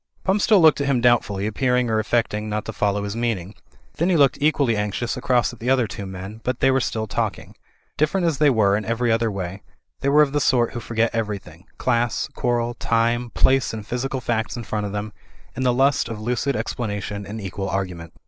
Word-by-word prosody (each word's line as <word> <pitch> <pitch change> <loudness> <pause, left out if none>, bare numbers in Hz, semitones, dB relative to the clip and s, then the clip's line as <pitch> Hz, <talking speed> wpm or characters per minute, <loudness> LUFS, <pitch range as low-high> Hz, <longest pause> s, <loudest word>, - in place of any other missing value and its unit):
Pump 195 +2 +1
still 210 -1 +5
looked 160 -3 +5
at 140 - -1
him 135 -3 +2
doubtfully, 115 -5 +2
appearing 125 +3 +1
or 110 -1 +1
affecting 110 -1 0
not 105 0 -2
to 110 - -5
follow 100 0 0
his 100 +1 -4
meaning. 110 -5 -2 0.4
Then 170 +3 +1
he 180 - +3
looked 140 -1 +4
equally 145 -6 +2
anxiously 105 +3 -2
across 125 -1 +1
at 120 - -13
the 120 - -2
other 130 -2 +3
two 100 -1 -6
men; 95 +4 -8
but 125 -1 -2
they 135 - +4
were 130 - +3
still 110 -3 -2
talking. 100 - -3 0.4
Different 165 +5 +1
as 160 -5 0
they 150 - +5
were 105 -6 +3
in 105 - -1
every 115 +2 0
other 115 0 +2
way, 95 -1 -5 0.4
they 140 - 0
were 150 +2 +6
of 140 - -1
the 145 - +1
sort 120 -3 +2
who 120 - -4
forget 115 0 -1
everything, 100 -5 -4
class, 120 -2 0
quarrel, 120 -2 0
time, 120 +1 0
place 135 -2 +3
and 110 -2 -7
physical 130 +3 -3
facts 115 0 -2
in 120 - -5
front 105 -1 -3
of - - -6
them, 105 +1 -4 0.4
in - - -4
the 125 -1 +3
lust 135 0 +2
of 110 -2 -5
lucid 125 +4 -1
explanation 105 -2 -3
and 110 +3 -6
equal 95 -1 -4
argument. 90 -4 -4
115 Hz, 215 wpm, -22 LUFS, 105-130 Hz, 0.4 s, were